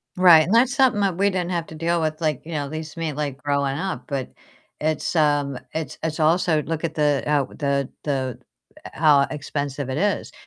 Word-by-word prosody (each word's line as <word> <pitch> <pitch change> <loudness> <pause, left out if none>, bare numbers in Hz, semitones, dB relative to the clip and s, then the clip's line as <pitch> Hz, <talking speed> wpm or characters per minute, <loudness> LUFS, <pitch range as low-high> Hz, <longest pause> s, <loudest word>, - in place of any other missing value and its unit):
Right, 175 -4 +7
and 190 - -1
that's 250 +3 +4
something 255 -6 +3
that 190 -4 0
we 200 +1 +3
didn't 180 -2 -2
have 170 -2 -1
to 160 - -10
deal 170 +2 0
with, 155 0 -2
like, 155 -4 0
you 165 - -8
know, 145 -3 -2
at 140 - -9
least 155 +1 -6
me, 165 -2 -2
like 140 -2 -4
growing 140 -1 0
up, 185 +3 -3
but 140 -4 -3 0.5
it's, 155 +2 -1
um 145 -3 +2 0.2
it's 160 -4 -4
it's 160 0 -2
also 160 0 +3
look 160 +1 -4
at 160 -1 -2
the, 145 -3 +1
uh, 145 -2 +2
the 140 -2 -2
the, 130 -4 -2 0.6
how 150 -3 +5
expensive 145 -2 -4
it 130 - -2
is. 200 +5 0
155 Hz, 205 wpm, -23 LUFS, 145-170 Hz, 0.6 s, Right